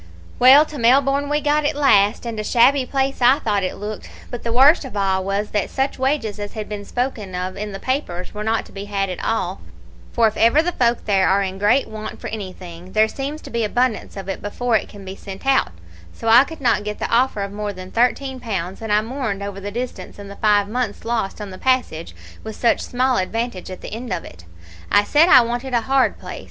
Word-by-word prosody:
"Well, 270 +5 +8
to 300 -2 -8
Melbourne 275 +4 +3
we 295 0 +1
got 300 +1 +1
at 295 +1 0
last, 215 -7 +3
and 230 -2 -4
a - - -2
shabby 255 +4 +3
place 270 0 -1
I 250 +3 +6
thought 210 -8 0
it 185 - -3
looked; 210 +1 -7 0.2
but 245 - -5
the 235 - -3
worst 275 +8 +5
of 260 -6 -7
all 190 -1 +1
was, 200 +2 -2
that 205 -2 -1
such 270 0 -2
wages 260 -6 -1
as 205 0 -6
had 215 -2 -5
been 205 -1 -6
spoken 225 -7 -3
of 185 +1 -3
in 210 +1 -5
the 195 - -6
papers 195 -10 -3
were 210 0 -5
not 220 +1 0
to - - -16
be 195 0 -7
had 195 -2 -2
at 180 - -6
all, 190 -4 -2 0.5
for 235 - +3
if 215 - -3
ever 235 +8 +4
the 355 - 0
folk 240 -6 0
there 195 -3 +3
are 200 +1 +3
in 190 0 -5
great 210 +7 +3
want 215 -1 -7
of - - -13
anything, 185 -4 -8
there 215 0 +4
seems 280 +6 -5
to - - -10
be 235 0 -1
abundance 230 0 -1
of 195 -1 -7
it 195 - -4
before 230 +3 -1
it 215 - 0
can 200 -2 -12
be 190 0 -7
sent 195 +3 -10
out; 270 - +2 0.4
so 225 - -8
I 235 +4 +7
could 320 -1 -10
not 235 -5 +2
get 210 0 -4
the - - -4
offer 235 -3 +2
of 200 - -5
more 205 0 -4
than 185 -1 -10
thirteen 255 +2 0
pounds, 190 -6 -4
and 220 -1 -4
I 210 +1 +4
mourned 225 -4 -4
over 200 -1 -6
the 200 +1 -5
distance, 230 -4 -6
and 200 -1 -9
the - - -9
five 205 -2 +3
months 225 -1 -3
lost 225 -4 -2
on 205 -2 -7
the 185 - -10
passage, 250 -11 -1 0.3
with 220 -1 -7
such 235 - +2
small 255 +1 0
advantage 220 0 -3
at 185 - -8
the - - -8
end 235 +2 -6
of 180 -2 -3
it. 85 0 -13 0.5
I 205 - +5
said 305 +10 +4
I 255 - +9
wanted 240 +2 -3
a 235 - +2
hard 265 +2 +1
place. - - -8
220 Hz, 240 wpm, -21 LUFS, 200-255 Hz, 0.5 s, I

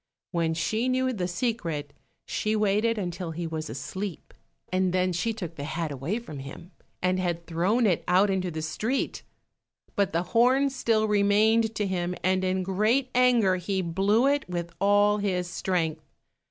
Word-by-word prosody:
When 165 -2 0
she 220 +10 0
knew 260 0 +1
the 180 -5 -2
secret, 170 - -2 0.3
she 215 +1 -1
waited 215 +2 +2
until 180 -3 -4
he 165 +1 -4
was 160 -1 -4
asleep, 190 -2 -6 0.4
and 185 -1 +1
then 185 0 +1
she 205 +7 0
took 180 -7 -6
the 140 - -5
hat 160 +1 -3
away 140 - -2
from 230 -12 -8
him, 140 +7 -10 0.3
and 185 0 +2
had 175 -2 0
it 170 0 -19
thrown 185 +8 +1 0.2
out 190 +3 +4
into 185 -1 -1
the 160 -2 -5
street. 215 +12 -2 0.7
But 200 -2 +1
the 170 0 0
horn 260 +4 +4
still 225 -5 +1
remained 215 +2 +3
to 210 - 0
him, 180 -2 -2
and 185 0 +2
in 185 0 0
great 215 +8 +1
anger 240 -7 +4
he 190 +1 -2
blew 195 +8 +2
it 280 -6 +1
with 170 -1 -4
all 205 +1 +4
his 185 -3 -1
strength. 175 -3 -1
190 Hz, 165 wpm, -27 LUFS, 175-220 Hz, 0.7 s, out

